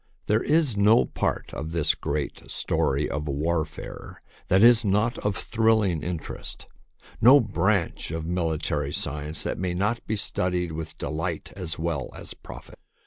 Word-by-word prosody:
There 105 +2 +2
is 150 -6 +2
no 105 +4 +5
part - - -2
of 80 +1 -5
this 85 -3 +2
great 75 -1 -4
story 70 +2 0
of 75 +2 -4
warfare 75 +2 -3 0.2
that 95 +3 +4
is 120 0 +7
not 105 +3 +1
of 105 -1 -1
thrilling 110 -7 +2
interest, 85 0 -5 0.6
no 130 +6 +9
branch 100 - 0
of 80 0 -4
mili 85 -2 -1
tary 75 -1 -2
science 75 0 -1
that - - -3
may 90 -1 -1
not 105 +6 0
be 110 - 0
studied 90 -4 0
with 80 0 -6
delight 80 +1 -4
as 90 -5 -5
well 80 -5 -2
as - - -8
profit. - - -12
85 Hz, 150 wpm, -26 LUFS, 80-105 Hz, 0.6 s, no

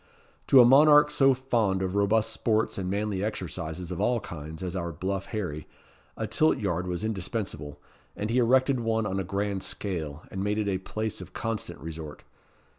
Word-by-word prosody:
To 135 - +7
a 120 - +9
monarch 150 +3 +7
so 135 -2 +4
fond 115 -7 0
of 95 -1 -2
robust 105 +2 +2
sports 110 -3 0
and 90 -1 -3
manly 100 -1 -1
exercises 90 -4 -4
of 90 - -3
all 120 -1 +2
kinds 80 -2 -8
as 90 0 -4
our 85 -2 -2
bluff 95 +5 -3
Harry, 90 -9 -4 0.5
a - - -2
tilt 155 0 +2
yard 90 -3 -2
was 90 +2 -3
indispensable; 95 -8 -4 0.4
and 105 +2 -3
he 125 - +3
erected 130 +2 +3
one 110 -1 0
on 95 -1 -1
a - - -1
grand 100 +1 -2
scale, 80 -8 -4
and 95 +1 -3
made 105 +1 0
it 105 -1 0
a 95 -2 0
place 110 +2 -4
of 90 0 -11
constant 115 -1 -4
resort. 80 -1 -8
100 Hz, 185 wpm, -27 LUFS, 90-115 Hz, 0.5 s, a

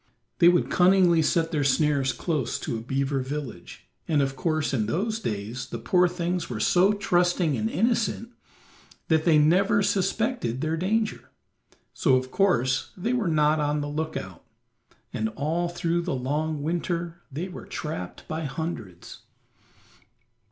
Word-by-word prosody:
They 170 - +7
would 175 0 +2
cunningly 180 -2 +5
set 165 +1 +1
their 150 -3 0
snares 135 0 +2
close 150 -8 -2
to - - -3
a 110 - -4
beaver 135 +3 -1
village, 130 -8 -6 0.2
and 155 -3 +2
of 135 0 -2
course, 155 0 -1
in 110 -5 0
those 215 - -1
days, 115 - -4
the - - -5
poor 180 -1 +3
things 175 0 -2
were 115 -4 -4
so 185 - +4
trusting 175 -5 +1
and 110 -1 -1
innocent 230 - 0 0.8
that 160 -1 +2
they 165 -3 +5
never 180 +7 +4
suspected 195 - 0
their 155 +1 0
danger; 215 +6 -1 0.6
so 135 -6 +3
of 130 0 -1
course 135 -9 +1
they 225 +7 -1
were 235 -6 0
not 155 -1 +3
on 150 0 0
the 145 - -3
lookout, 145 - -5 0.7
and 110 0 -1
all 165 +5 -1
through 170 0 -1
the 170 -5 -2
long 145 +4 -2
winter 170 +1 -2
they 160 +7 -4
were 185 - -10
trapped 150 - -6
by 160 0 -3
hundreds. 135 - -6
160 Hz, 150 wpm, -26 LUFS, 135-180 Hz, 0.8 s, They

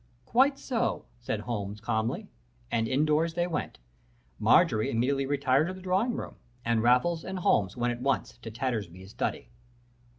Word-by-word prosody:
"'Quite 270 - +3
so,' 240 -3 -1
said 110 -3 -3
Holmes, 105 -3 -4
calmly. 110 0 -1 0.4
And 115 0 +1
in 135 +5 +2
doors 160 +2 +1
they 175 0 +1
went. 170 -3 -3 0.6
Marjorie 110 0 +4
immediately 135 +4 +1
retired 140 +1 +2
to 185 - -4
the - - -10
drawing 190 +6 +1
room, - - -6 0.3
and 115 -1 +2
Holmes 125 +8 +3
and 190 0 -5
Raffles 100 - +2
went 120 0 +1
at 120 - -9
once 135 -2 -1
to 115 - -7
Tattersby's 105 -6 -4
study. - - -3
130 Hz, 160 wpm, -29 LUFS, 115-170 Hz, 0.6 s, Marjorie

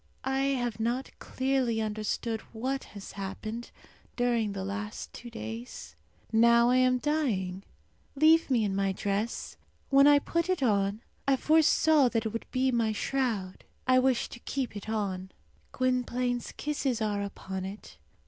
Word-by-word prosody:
I 265 +1 +1
have 240 -3 -2
not 240 +4 -1
clearly 260 -3 0
understood 220 +1 -2
what 260 +4 -2
has 200 - -8
happened 215 +4 -6 0.5
during 235 -4 +1
the 190 -1 -4
last 210 +2 -5
two 240 - -9
days. 110 - -7 0.4
Now 235 +1 +5
I 255 - +4
am 255 0 +4
dying. 235 -11 -1 0.5
Leave 315 +3 +5
me 240 -4 +3
in 200 -2 -1
my 195 -1 +1
dress. 200 +4 -2 0.3
When 275 +1 +7
I 290 0 +8
put 335 +4 -1
it 370 -7 +1
on 200 -2 +1 0.3
I 275 - +5
foresaw 310 -1 +4
that 225 -2 -1
it - - 0
would 230 +1 -5
be 260 0 +1
my 230 -2 +1
shroud. 220 -6 -2 0.2
I 255 0 +6
wish 255 -1 +2
to - - -10
keep 260 -3 -3
it 205 +1 -7
on. 190 -4 -2 0.4
Gwynplaine's 250 -1 0
kisses 280 -5 -1
are 210 -2 0
upon 190 -1 -5
it. 190 - -8
235 Hz, 150 wpm, -29 LUFS, 205-260 Hz, 0.5 s, I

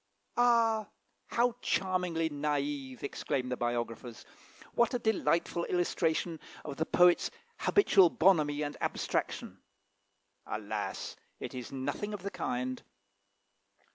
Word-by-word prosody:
"Ah! 230 -3 +4 0.4
how 240 0 +1
charmingly 180 -3 0
naive!" 145 -3 -2
exclaim 130 -2 -2
the 125 - 0
biographers; 120 -1 -3 0.5
"what 235 +1 +3
a - - +3
delightful 185 -6 +1
illustration 170 -2 0 0.3
of 140 -2 -5
the 160 - 0
poet's 175 -1 +5 0.3
habitual 195 - +5
bonhomie 155 -5 +3
and 145 0 -3
abstraction!" - - -2 0.9
Alas! - - -4 0.2
it - - -6
is 125 -2 -6
nothing 145 +11 -3
of 195 - -9
the 200 - -3
kind. 125 +1 -2
160 Hz, 110 wpm, -31 LUFS, 140-195 Hz, 0.9 s, poet's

